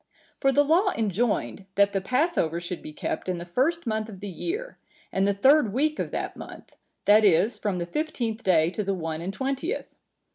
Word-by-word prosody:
For 270 - +3
the 290 +2 +4
law 350 +7 +3
enjoined, 210 -2 -1
that 200 0 +4
the 195 - 0
Passover 250 - +1
should 175 +1 -6
be - - -8
kept 150 - -4
in 180 - -1
the 170 - -6
first 280 - 0
month 220 -1 -2
of 195 -3 -10
the 205 - -6
year, 415 - -5 0.3
and 195 +1 +1
the 200 - +3
third 265 +1 +5
week 305 +5 +1
of - - -2
that - - -4
month, - - -11 0.3
that 210 +1 +6
is, 205 +4 +3
from 200 -3 -1
the 170 - -2
fifteenth 235 - -3
day 165 -3 +3
to 210 - -3
the 195 0 -1
one 165 -2 -4
and 180 +3 -3
twentieth. 275 - -3
215 Hz, 205 wpm, -26 LUFS, 185-275 Hz, 0.3 s, that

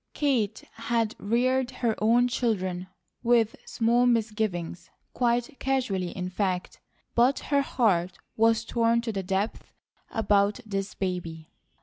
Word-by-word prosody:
Kate 240 -8 0
had 230 -1 0
reared 250 +4 +1
her 245 -3 -1
own 235 +3 +4
children 190 -7 -1 0.3
with 235 -2 +3
small 240 +2 +2
misgivings, 210 -7 -1 0.2
quite 240 +2 0
casually, 245 -10 0
in 180 0 -4
fact; 185 -1 -2 0.3
but 245 +3 +4 0.2
her 280 - +5
heart 185 -9 +1 0.2
was 225 0 +3
torn 230 0 +2
to 235 -1 -3
the 195 -2 -2
depths 195 +3 -2 0.4
about 205 0 +2
this 195 -1 -3
baby. 170 -4 -4
225 Hz, 120 wpm, -27 LUFS, 190-240 Hz, 0.4 s, her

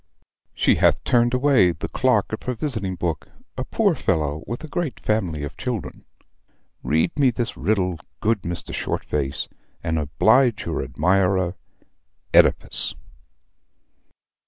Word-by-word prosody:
She - - +3
hath - - +3
turned 120 0 +3
away 125 -9 +4
the 80 - -5
clerk 125 -6 +1
of 110 - -3
her 125 - -3
visiting 110 -9 -2
book, 85 -3 -3 0.3
a - - -3
poor - - +1
fellow 75 -1 -1
with 120 +5 -5
a - - -6
great 155 -3 -3
family 90 -9 -1
of 75 - -6
children. 120 -7 -5 0.8
Read 80 +2 +1
me 135 -2 +5
this 120 -1 -3
riddle, 95 -5 0 0.2
good 110 -2 +1
Mr. 85 -1 -5
Shortface, 70 -2 -2 0.4
and 80 -1 0
oblige 110 - +3
your - - -2
admirer 95 -1 +1 0.8
OEDIPUS." - - +3
100 Hz, 130 wpm, -23 LUFS, 85-120 Hz, 0.8 s, me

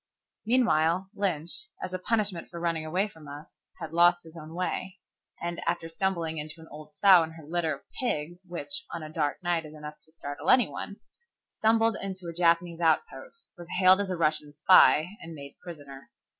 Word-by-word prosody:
Meanwhile, 190 -6 +2
Lynch, 190 - -2
as 185 - -6
a 185 - -2
punishment 205 -4 -1
for 170 - -8
running 165 -2 -1
away 185 +6 0
from 160 -7 -15
us, 145 +2 -9 0.5
lost 175 +1 +4
his 165 0 -14
own 160 0 -10
way, 185 +1 -3 0.4
and, 170 0 -4
after 170 -1 -1
stumbling 165 -2 -1
into 155 +2 -5
an 160 - -13
old 150 0 -12
sow 190 +1 +7
and 160 0 -4
her 160 -2 -12
litter 160 -1 -1
of - - -17 0.2
pigs, 175 - -2
which 180 +12 -3
on 170 - -6
a 155 0 -9
dark 150 +2 -1
night 175 -2 0
is 155 0 -11
enough 150 0 -9
to 160 - -23
startle 145 0 -6
any 250 -4 +6
one, 200 - -6 0.6
stumbled 225 +1 +2
into 190 -2 -5
a 170 - -5
Japanese 170 0 +2
outpost, 460 - -1
was 175 -2 -12
hailed 185 +1 +6
as 200 - -3
a 185 - -2
Russian 155 -2 0
spy, 160 +5 +5
and 165 0 -9
made 140 -1 -11
prisoner. 145 -5 -11
170 Hz, 185 wpm, -28 LUFS, 155-185 Hz, 0.6 s, sow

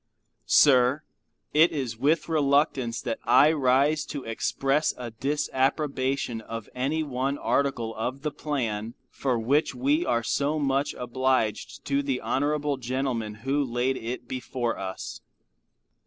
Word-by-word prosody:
Sir. 130 0 +5 0.5
It 160 +3 +5
is 130 -7 -3
with 150 +8 +1
reluctance 140 -6 +1
that 115 - -3
I 150 +3 +6
rise 140 +1 +2
to 145 -3 -5
express 135 +6 0
a 120 -2 -6
disapprobation 135 -1 -1
of 115 0 -7
any 140 +5 -1
one 135 0 -2
article 125 -7 0
of 130 +5 -4
the 150 - -1
plan 115 -7 -3 0.2
for 130 -3 -1
which 135 +7 +1
we 285 +6 +2
are 120 - 0
so 145 +6 0
much 140 -1 0
obliged 125 -4 -1
to 140 0 +1
the 135 -3 -1
honorable 145 +1 0
gentleman 125 -4 -2
who 140 +2 +1
laid 125 +1 0
it 120 +1 -5
before 125 -2 -3
us. 95 -1 -6
135 Hz, 130 wpm, -26 LUFS, 120-145 Hz, 0.5 s, I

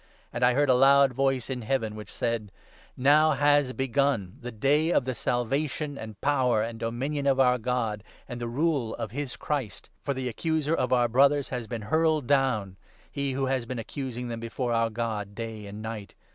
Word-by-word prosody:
And - - -4
10 125 - +6
I - - +2
heard 145 +1 +3
a - - +7
loud 135 +1 +5
voice 135 -1 0
in 130 -2 -4
Heaven 115 -2 -1
which 105 0 -9
said 115 -4 -2 0.2
— - - -26
' - - -36
Now 155 +1 +5
has 145 -1 +3
begun 135 -7 0
the 125 -2 -6
day 145 +8 +2
of 125 - +2
the 130 - -1
Salvation, 140 +6 -1
and 110 -5 -8
Power, 130 -6 +2
and 115 0 -5
Dominion 135 +6 -2
of 135 -1 +3
our 125 -1 +4
God, 115 -3 -1 0.2
and 120 -2 -6
the 120 - -2
Rule 135 -2 0
of 110 - -5
his 140 0 -5
Christ; 135 -10 -4
for 140 - -2
the 130 -1 -3
Accuser 155 +5 -1
of 130 -6 0
our 120 -1 +4
Brothers 140 +3 +3
has 125 -3 -4
been 115 -2 -5
hurled 155 +3 +2
down, 120 -8 +1 0.3
he 140 -1 -2
who 135 +1 0
has 130 -3 -1
been 130 +1 -4
accusing 125 +1 -5
them 115 -1 -4
before 120 +1 -3
our 115 0 +2
God 110 -3 -3
day 110 -2 -6
and 105 +2 -8
night. 110 -2 -6
125 Hz, 205 wpm, -27 LUFS, 115-140 Hz, 0.3 s, a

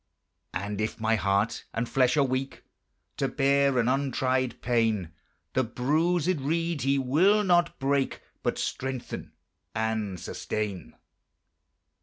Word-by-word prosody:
And 100 +3 -2
if 110 +2 -2
my 110 0 +2
heart 100 +3 0
and 115 +1 -1
flesh 130 +1 +2
are 145 - +5
weak 130 0 -2 0.5
To 135 - +1
bear 140 -1 +2
an 120 -1 +2
untried 130 -1 0
pain, 110 -8 +1 0.4
The 130 - +2
bruisèd 155 +7 +1
reed 165 +1 0
He 135 +2 +2
will 170 +11 +4
not 175 -3 +3
break, 135 0 0 0.2
But - - -1
strengthen 130 -2 -4 0.4
and 110 -4 -1
sustain. 100 -4 -4
130 Hz, 120 wpm, -28 LUFS, 110-140 Hz, 0.5 s, are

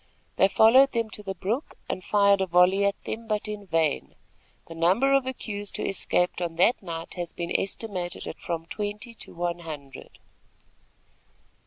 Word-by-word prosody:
They 190 - +6
followed 245 +7 +6
them 230 -2 -1
to 210 - -7
the 195 -2 -5
brook, 220 - -3
and 185 - -4
fired 200 -1 +4
a 190 - +1
volley 180 +3 +4
at 200 - 0
them, 230 +1 -5
but 215 -1 -1
in 210 -1 -6
vain. 160 -4 0 0.5
The 165 - -10
number 190 +12 +3
of 275 -1 +3
accused 205 -5 -4
who - - -3
escaped 180 -2 0
on 170 -2 -2
that 185 +9 +3
night, 165 -3 -6
has 175 -2 -5
been 170 0 -4
estimated 190 -3 -3
at - - -7
from 165 -1 -4
twenty 210 +5 -5
to - - -9
one 175 0 -2
hundred. 145 -5 -9
195 Hz, 170 wpm, -26 LUFS, 175-215 Hz, 0.5 s, They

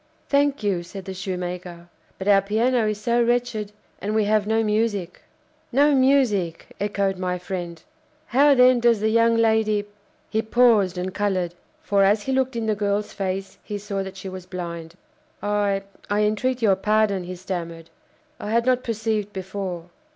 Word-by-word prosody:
"Thank 280 -3 +2
you!" 195 -4 +1
said 185 +2 -9
the 190 - -5
shoemaker; 180 -2 -5 0.3
"but 190 - -6
our 200 -1 +6
piano 225 +3 +1
is 210 -1 -2
so 235 +3 +1
wretched, 235 -3 0 0.3
and 210 +2 -2
we 220 - +3
have 210 0 +1
no 225 +1 +2
music." 210 -4 -1 0.5
"No 285 +4 +4
music!" 260 -11 +2
echoed 200 -2 -1
my 180 -1 -1
friend; 175 -2 -6 0.4
"how, 280 +2 +4
then, 250 -1 +6
does 235 -2 +3
the 215 +1 +1
young 230 +1 +3
lady 220 -2 +2 0.2
" - - -38
he 220 - +1
paused 220 -5 +3
and 180 +1 -3
coloured; 185 -4 -1 0.3
for, 200 -1 +3
as 205 +2 +3
he 265 - -2
looked 260 -1 0
in 230 -1 -2
the 215 - +1
girl's 205 0 -1
face, 195 0 -4
he 210 - -5
saw 200 -1 -4
that 190 0 -7
she 190 - -7
was 185 -1 -8
blind. 170 -2 -6 0.5
"I 205 -1 0 0.3
I 205 +1 +1
entreat 235 +4 0
your 195 -3 +4
pardon," 210 -2 +1
he 180 +1 -6
stammered. 170 -3 -6 0.5
"I 210 - -5
had 230 +1 +2
not 255 0 +2
perceived 220 -2 -2
before. 190 -3 -5
205 Hz, 175 wpm, -23 LUFS, 185-225 Hz, 0.5 s, our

